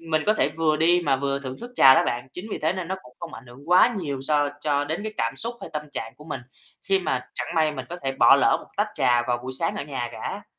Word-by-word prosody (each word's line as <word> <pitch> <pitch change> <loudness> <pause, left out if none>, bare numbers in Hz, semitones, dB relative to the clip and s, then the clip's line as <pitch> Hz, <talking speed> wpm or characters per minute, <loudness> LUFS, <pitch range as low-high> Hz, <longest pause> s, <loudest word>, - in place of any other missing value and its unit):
mình 160 -2 0
có 215 - +4
thể 150 - +2
vừa 155 0 +1
đi 175 +3 +4
mà 135 -2 +3
vừa 140 0 -1
thưởng 130 -1 -6
thức 240 +1 -8
trà 135 - +8
đó - - +4
bạn. 120 +2 -3
Chính 180 +4 -7
vì - - -3
thế 160 +2 +1
nên 185 -2 -5
nó 190 - -2
cũng 125 0 -18
không 170 -2 -7
ảnh 130 - -12
hưởng 135 +6 -14
quá 225 +6 +6
nhiều 140 -6 -4
so 145 +1 +1
cho 145 -1 0
đến 160 +7 -3
cái 215 0 -4
cảm 115 0 -1
xúc 235 +2 -3
hay - - -8
tâm 150 -1 -3
trạng - - -6
của 150 - -14
mình, 155 - -5 0.4
khi 195 -1 +2
mà 130 -8 -2
chẳng - - -4
may 155 -1 +2
mình 130 -3 -6
có 175 - -6
thể 135 0 -1
bỏ - - +6
lỡ - - +4
một - - -15
tách - - +1
trà 120 -1 +3
vào 120 0 -1
buổi 130 +1 -5
sáng 165 +6 +1
ở - - -3
nhà 135 -5 -4
cả. - - -6
150 Hz, 295 wpm, -24 LUFS, 130-170 Hz, 0.4 s, trà